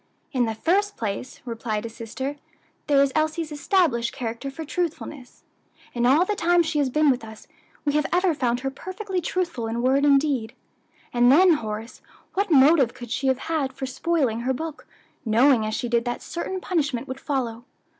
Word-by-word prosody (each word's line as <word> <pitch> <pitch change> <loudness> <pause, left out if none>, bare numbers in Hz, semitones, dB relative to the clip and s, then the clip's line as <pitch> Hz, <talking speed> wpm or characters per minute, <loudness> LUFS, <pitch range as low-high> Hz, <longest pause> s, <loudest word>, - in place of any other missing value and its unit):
"In 255 -4 +1
the 225 -1 -3
first 400 - +1
place," 220 +3 -4
replied 225 -3 -3
his 230 0 -7
sister, 260 +5 -5 0.5
"there 280 -2 +5
is 275 - +1
Elsie's 310 +1 0
established 290 - +1
character 235 +1 -5
for 315 +4 -7
truthfulness 305 -6 -5 0.5
in 240 0 +1
all 295 +8 +5
the 420 - -1
time 350 -2 +3
she 315 -2 -1
has 280 -2 +2
been 300 +2 +4
with 250 -2 -2
us, 220 -1 -11 0.4
we 290 - +1
have 300 0 +1
ever 360 0 +3
found 245 -4 0
her 270 0 -2
perfectly 375 +5 -4
truthful 340 -10 -2
in 235 +2 -2
word 270 +2 +3
and 280 -1 +6
deed. 265 -6 -2 0.6
And 245 +1 +5
then, 355 +5 +7
Horace, 220 -4 -5 0.3
what 400 +1 0
motive 280 -3 +5
could 240 -2 -9
she 270 - -1
have 260 -1 +3
had 290 -3 -2
for 270 0 -5
spoiling 265 -3 0
her 255 +2 0
book, 315 +3 -6 0.4
knowing 230 0 +4
as 215 - -2
she 245 - -2
did 235 -1 +1
that 240 0 -3
certain 370 +2 -4
punishment 285 -11 -1
would 260 +1 -6
follow? 245 -5 -3
270 Hz, 185 wpm, -24 LUFS, 240-320 Hz, 0.6 s, then